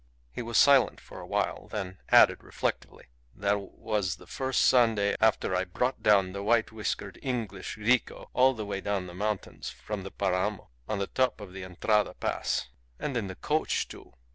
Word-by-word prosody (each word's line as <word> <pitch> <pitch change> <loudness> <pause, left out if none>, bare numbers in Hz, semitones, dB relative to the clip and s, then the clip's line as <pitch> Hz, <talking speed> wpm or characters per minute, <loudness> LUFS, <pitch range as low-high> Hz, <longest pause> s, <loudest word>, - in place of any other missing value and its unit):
He - - -5
was 115 -1 -1
silent 140 -3 +5
for - - -12
a - - -9
while, - - -1
then 95 -3 -5
added - - +6
reflectively, - - -4 0.3
"That 100 +1 +1
was 100 -1 -2
the - - -16
first 130 -1 -1
Sunday 115 -5 +4
after 110 -4 +3
I 90 - +1
brought 110 +8 -2
down 100 -3 +4
the 100 +1 -5
white 115 +2 +2
whiskered 105 -2 -4
English 115 -8 -4
rico 120 +4 +1
all 130 +1 +4
the 110 -2 -4
way 100 -1 -3
down 100 -2 -1
the 90 - -9
mountains 105 +2 -3
from 105 -2 -6
the 95 - -7
Paramo 95 +1 -1 0.2
on 105 - 0
the 100 - -1
top 125 +1 0
of 100 -3 -10
the 95 0 -7
Entrada 105 +4 +1
Pass - - -2 0.3
and 135 - -3
in 115 -5 -1
the 95 - -7
coach, 155 +9 0
too! - - -12
105 Hz, 185 wpm, -29 LUFS, 95-115 Hz, 0.3 s, added